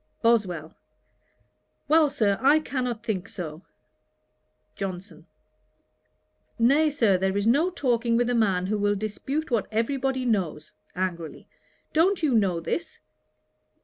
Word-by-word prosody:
BOSWELL. 185 Hz, -9 st, +1 dB, 1.1 s
'Well, 310 Hz, -1 st, +5 dB
Sir, 215 Hz, -8 st, +1 dB
I 280 Hz, +3 st, +5 dB
cannot 250 Hz, -6 st, -3 dB
think 210 Hz, -6 st, -3 dB
so.' 160 Hz, -3 st, -7 dB, 1.1 s
JOHNSON. 180 Hz, -3 st, -7 dB, 1.3 s
'Nay, 280 Hz, +7 st, +4 dB
Sir, 225 Hz, -10 st, +2 dB
there 190 Hz, +1 st, 0 dB
is 205 Hz, -, 0 dB
no 285 Hz, +10 st, +3 dB
talking 240 Hz, -8 st, 0 dB
with 240 Hz, 0 st, +2 dB
a 245 Hz, -, 0 dB
man 195 Hz, -6 st, +1 dB
who 210 Hz, +2 st, -1 dB
will 205 Hz, 0 st, +1 dB
dispute 250 Hz, +9 st, -4 dB
what 225 Hz, -4 st, +1 dB
every 230 Hz, +6 st, 0 dB
body 265 Hz, -1 st, -1 dB
knows, 170 Hz, -9 st, -1 dB, 0.2 s
(angrily.) 175 Hz, -3 st, -4 dB, 0.5 s
Don't 340 Hz, +3 st, +2 dB
you 290 Hz, -5 st, +2 dB
know 195 Hz, -6 st, +2 dB
this?' 315 Hz, -, -4 dB
225 Hz, 125 wpm, -25 LUFS, 190-270 Hz, 1.3 s, Well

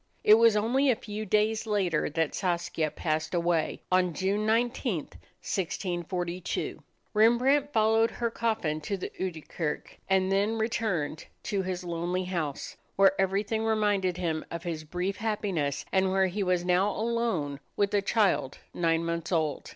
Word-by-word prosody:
It 210 Hz, -, +7 dB
was 230 Hz, 0 st, +6 dB
only 255 Hz, +6 st, +2 dB
a 250 Hz, -, +4 dB
few 215 Hz, 0 st, -6 dB
days 215 Hz, +3 st, +1 dB
later 190 Hz, -7 st, +1 dB
that 160 Hz, 0 st, -1 dB
Saskia 170 Hz, -4 st, -1 dB
passed 155 Hz, +2 st, -2 dB
away, 170 Hz, -2 st, 0 dB
on 180 Hz, -2 st, +2 dB
June 200 Hz, +3 st, 0 dB
19, 235 Hz, 0 st, +1 dB
1642. 175 Hz, +2 st, -4 dB, 0.3 s
Rembrandt 250 Hz, +6 st, +4 dB
followed 225 Hz, 0 st, +3 dB
her 235 Hz, -1 st, -2 dB
coffin 215 Hz, -11 st, -1 dB
to 200 Hz, +5 st, -3 dB
the 185 Hz, -, -5 dB
Oude 170 Hz, -5 st, -4 dB
Kerk 155 Hz, -3 st, -4 dB
and 190 Hz, 0 st, +2 dB
then 205 Hz, +3 st, +1 dB
returned 215 Hz, -9 st, -1 dB, 0.2 s
to 200 Hz, -2 st, -1 dB
his 185 Hz, -1 st, -3 dB
lonely 175 Hz, +1 st, -2 dB
house, 170 Hz, -6 st, -3 dB, 0.2 s
where 195 Hz, -1 st, +6 dB
everything 205 Hz, +3 st, 0 dB
reminded 205 Hz, -5 st, +1 dB
him 165 Hz, -3 st, -1 dB
of 170 Hz, 0 st, -6 dB
his 165 Hz, -3 st, -4 dB
brief 180 Hz, +5 st, -3 dB
happiness 200 Hz, -10 st, -1 dB
and 190 Hz, 0 st, +3 dB
where 190 Hz, 0 st, +3 dB
he 190 Hz, +3 st, -2 dB
was 180 Hz, -2 st, +1 dB
now 180 Hz, +3 st, +3 dB
alone 215 Hz, -11 st, -1 dB, 0.2 s
with 200 Hz, 0 st, +1 dB
a 205 Hz, -, +3 dB
child 200 Hz, -, +1 dB, 0.2 s
nine 165 Hz, -1 st, +1 dB
months 170 Hz, +1 st, -3 dB
old. 160 Hz, -4 st, 0 dB
190 Hz, 150 wpm, -28 LUFS, 170-215 Hz, 0.3 s, It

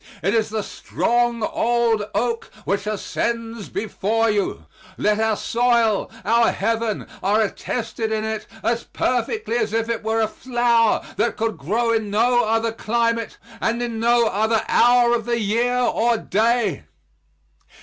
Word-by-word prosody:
It 195 Hz, +4 st, +1 dB
is 220 Hz, -2 st, +1 dB
the 215 Hz, -1 st, -2 dB
strong 240 Hz, +1 st, -1 dB
old 230 Hz, -1 st, +1 dB
oak 235 Hz, -1 st, -1 dB, 0.2 s
which 200 Hz, +1 st, -1 dB
ascends 230 Hz, +1 st, -3 dB
before 220 Hz, +1 st, 0 dB
you; 205 Hz, -2 st, -2 dB, 0.3 s
yet 210 Hz, +1 st, +1 dB
our 220 Hz, -1 st, +1 dB
soil, 235 Hz, -3 st, +1 dB, 0.2 s
our 230 Hz, +2 st, +4 dB
heaven, 225 Hz, 0 st, -1 dB, 0.2 s
are 205 Hz, +3 st, +2 dB
attested 225 Hz, +1 st, -3 dB
in 215 Hz, 0 st, -1 dB
it 220 Hz, -1 st, -4 dB, 0.2 s
as 235 Hz, 0 st, 0 dB
perfectly 250 Hz, -, -1 dB
as 220 Hz, -2 st, -1 dB
if 225 Hz, 0 st, 0 dB
it 230 Hz, -1 st, -2 dB
were 220 Hz, +1 st, 0 dB
a 220 Hz, -, +2 dB
flower 240 Hz, -1 st, +1 dB
that -, -, 0 dB
could 225 Hz, -1 st, -1 dB
grow 225 Hz, +11 st, 0 dB
in 220 Hz, -2 st, -1 dB
no 240 Hz, +4 st, +3 dB
other 225 Hz, +1 st, +1 dB
climate 230 Hz, 0 st, -1 dB, 0.2 s
and 230 Hz, +1 st, 0 dB
in 230 Hz, -2 st, -3 dB
no 235 Hz, +1 st, +3 dB
other 220 Hz, +1 st, +1 dB
hour 245 Hz, 0 st, +4 dB
of 230 Hz, -2 st, 0 dB
the 235 Hz, 0 st, 0 dB
year 235 Hz, +4 st, +1 dB
or 240 Hz, -1 st, +2 dB
day. 220 Hz, -, 0 dB
225 Hz, 150 wpm, -22 LUFS, 215-235 Hz, 0.3 s, our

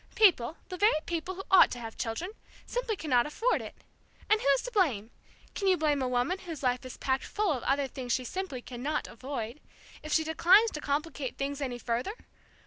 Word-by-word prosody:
People 350 Hz, -, +4 dB
the 365 Hz, -, -5 dB
very 410 Hz, -5 st, +4 dB
people 345 Hz, +2 st, -3 dB
who 385 Hz, -, -6 dB
ought 380 Hz, -, +8 dB
to -, -, -5 dB
have 225 Hz, -1 st, -7 dB
children 250 Hz, -, -3 dB, 0.3 s
simply 480 Hz, -3 st, -2 dB
cannot 260 Hz, -9 st, +2 dB
afford 455 Hz, +11 st, +1 dB
it! -, -, -8 dB, 0.6 s
And 430 Hz, -, +5 dB
who's 275 Hz, -1 st, +3 dB
to -, -, -5 dB
blame? 260 Hz, -, +1 dB, 0.4 s
Can 395 Hz, -, -2 dB
you 370 Hz, -1 st, +5 dB
blame 295 Hz, -3 st, +1 dB
a 260 Hz, -, 0 dB
woman 250 Hz, +10 st, 0 dB
whose 330 Hz, -7 st, -7 dB
life 250 Hz, 0 st, +1 dB
is 255 Hz, -, -9 dB
packed 265 Hz, 0 st, 0 dB
full 415 Hz, -4 st, 0 dB
of 260 Hz, -5 st, -1 dB
other 275 Hz, +2 st, +1 dB
things 255 Hz, -1 st, -6 dB
she 255 Hz, -, +1 dB
simply 330 Hz, -5 st, -4 dB
cannot 260 Hz, +5 st, -3 dB
avoid, 250 Hz, 0 st, -6 dB, 0.4 s
if 305 Hz, -, -7 dB
she 320 Hz, -, +3 dB
declines 370 Hz, +8 st, +5 dB
to 300 Hz, -, -6 dB
complicate 290 Hz, -2 st, -2 dB
things 280 Hz, +1 st, -3 dB
any 255 Hz, -3 st, -2 dB
further? 240 Hz, -, -2 dB
290 Hz, 200 wpm, -30 LUFS, 250-370 Hz, 0.6 s, ought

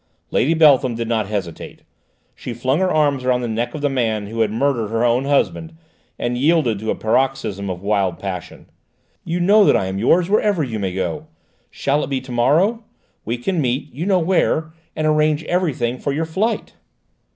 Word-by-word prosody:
Lady 160 Hz, +6 st, +2 dB
Beltham 140 Hz, -6 st, +4 dB
did 115 Hz, 0 st, -3 dB
not 110 Hz, -3 st, 0 dB
hesitate. 100 Hz, -6 st, -6 dB, 0.5 s
She 120 Hz, -, -7 dB
flung 130 Hz, +6 st, 0 dB
her 185 Hz, -1 st, +1 dB
arms 145 Hz, -4 st, +1 dB
around 125 Hz, -1 st, +1 dB
the 120 Hz, -, -2 dB
neck 120 Hz, +3 st, -2 dB
of 150 Hz, -, -5 dB
the 145 Hz, -, +2 dB
man 115 Hz, -6 st, -1 dB
who 115 Hz, +3 st, -6 dB
had 110 Hz, -, +2 dB
murdered 115 Hz, 0 st, 0 dB
her 115 Hz, +2 st, 0 dB
own 120 Hz, +3 st, +2 dB
husband, 160 Hz, +3 st, 0 dB, 0.4 s
and 120 Hz, 0 st, -2 dB
yielded 145 Hz, -7 st, +2 dB
to 110 Hz, +1 st, -4 dB
a -, -, +1 dB
paroxysm 110 Hz, -4 st, -1 dB
of 90 Hz, 0 st, -5 dB
wild 100 Hz, -4 st, 0 dB
passion. 90 Hz, -2 st, -7 dB, 0.6 s
"You 170 Hz, +1 st, -2 dB
know 205 Hz, +4 st, +5 dB
that -, -, +4 dB
I -, -, -1 dB
am 95 Hz, +1 st, -3 dB
yours, 170 Hz, -, +3 dB
wherever 205 Hz, -4 st, +2 dB
you 115 Hz, -5 st, -4 dB
may 95 Hz, -2 st, -3 dB
go. 150 Hz, +11 st, -3 dB, 0.4 s
Shall 140 Hz, +2 st, -1 dB
it -, -, -5 dB
be 135 Hz, -2 st, -1 dB
to 130 Hz, 0 st, -11 dB
morrow? 175 Hz, -, +2 dB, 0.4 s
We 115 Hz, +3 st, -2 dB
can 165 Hz, +8 st, -1 dB
meet 130 Hz, +2 st, -2 dB
you 160 Hz, +8 st, -4 dB
know 195 Hz, -2 st, +3 dB
where 160 Hz, -2 st, +1 dB, 0.2 s
and 155 Hz, -, -2 dB
arrange 155 Hz, 0 st, +2 dB
everything 140 Hz, -9 st, -1 dB
for 140 Hz, -, -2 dB
your 155 Hz, +4 st, -1 dB
flight." 195 Hz, +9 st, -2 dB
130 Hz, 195 wpm, -20 LUFS, 115-160 Hz, 0.6 s, know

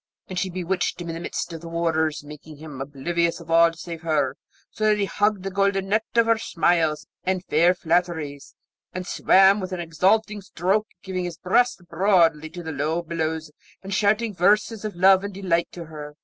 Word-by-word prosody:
And 185 Hz, -1 st, -3 dB
she 190 Hz, -, -1 dB
bewitched 180 Hz, +1 st, -2 dB
him 170 Hz, -1 st, -6 dB
in -, -, -3 dB
the 165 Hz, -, -5 dB
midst 175 Hz, -, -4 dB
of 165 Hz, -, -7 dB
the 170 Hz, -, -9 dB
waters, 160 Hz, -2 st, 0 dB
making 150 Hz, +1 st, -12 dB
him 150 Hz, -3 st, -9 dB
oblivious 165 Hz, +5 st, -1 dB
of 165 Hz, -1 st, -10 dB
all 165 Hz, 0 st, +6 dB
save 165 Hz, 0 st, -8 dB
her, 155 Hz, -5 st, 0 dB, 0.4 s
so 215 Hz, -, -2 dB
that 215 Hz, -1 st, +4 dB
he 205 Hz, -, +1 dB
hugged 205 Hz, -1 st, 0 dB
the 195 Hz, -, -4 dB
golden 195 Hz, 0 st, 0 dB
net 215 Hz, +2 st, +1 dB
of 230 Hz, -1 st, +5 dB
her 230 Hz, -1 st, +2 dB
smiles 165 Hz, -6 st, +1 dB, 0.2 s
and 185 Hz, 0 st, -1 dB
fair 170 Hz, +4 st, +3 dB
flatteries, 165 Hz, -5 st, -2 dB, 0.4 s
and 185 Hz, 0 st, -5 dB
swam 195 Hz, +3 st, +4 dB
with 185 Hz, -1 st, -5 dB
an 180 Hz, -, -3 dB
exulting 200 Hz, +6 st, +1 dB
stroke, 195 Hz, +3 st, -1 dB, 0.2 s
giving 185 Hz, -2 st, -3 dB
his 175 Hz, -2 st, -6 dB
breast 190 Hz, +2 st, +1 dB
broadly 165 Hz, -6 st, +2 dB
to 175 Hz, +1 st, -9 dB
the 160 Hz, -, -5 dB
low 155 Hz, +4 st, -1 dB
billows, 160 Hz, -1 st, -3 dB, 0.3 s
and 195 Hz, +1 st, -5 dB
shouting 210 Hz, +2 st, +1 dB
verses 210 Hz, +4 st, +2 dB
of 215 Hz, -3 st, -4 dB
love 190 Hz, +2 st, +5 dB
and 200 Hz, -1 st, -6 dB
delight 180 Hz, -3 st, 0 dB
to 170 Hz, -1 st, -8 dB
her. 150 Hz, -2 st, -9 dB
175 Hz, 195 wpm, -24 LUFS, 160-195 Hz, 0.4 s, all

